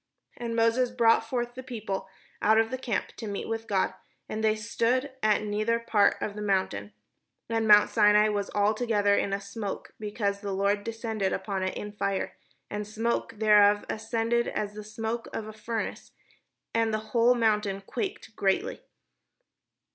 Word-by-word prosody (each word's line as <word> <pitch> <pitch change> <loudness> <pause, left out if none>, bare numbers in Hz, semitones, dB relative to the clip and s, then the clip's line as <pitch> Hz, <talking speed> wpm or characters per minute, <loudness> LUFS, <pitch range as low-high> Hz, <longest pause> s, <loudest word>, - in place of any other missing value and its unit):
And 235 -1 -4
Moses 230 +2 +3
brought 230 -2 +3
forth 240 -1 -2
the 255 - -7
people 220 -7 -5 0.3
out 220 +1 +4
of 225 0 +2
the 260 - -2
camp 235 -5 -2
to 225 - -6
meet 200 -1 -4
with 225 0 -3
God; 195 -2 +1 0.3
and 220 +1 -4
they 215 0 +3
stood 235 +5 0
at 215 -1 +3
the - - -5
nether 215 +2 +1
part 220 -3 +3
of 205 - -3
the 210 - -5
mount. 195 -2 +1
And 105 - -6
mount 210 -1 +7
Sinai 210 -1 +5
was 205 -1 -1
altogether 210 0 +2
in 200 - 0
a 195 - 0
smoke, 200 0 -6
because 205 -1 -2
the 200 -2 -3
Lord 200 +1 +1
descended 225 -3 -2
upon 190 0 -2
it 185 0 -2
in 210 - -5
fire: 200 -1 -2 0.3
and 210 0 -4
the 210 - -12
smoke 230 +1 -1
thereof 210 -1 +5
ascended 230 +2 0
as 210 -1 -3
the 210 0 -7
smoke 225 +2 -4
of 215 - -4
a 215 - -8
furnace, 220 +1 -4 0.6
and 225 -1 +2
the 215 0 -3
whole 240 +1 +5
mount 220 -3 +2 0.2
quaked 385 - -5
greatly. 385 - 0
215 Hz, 170 wpm, -28 LUFS, 205-230 Hz, 0.6 s, mount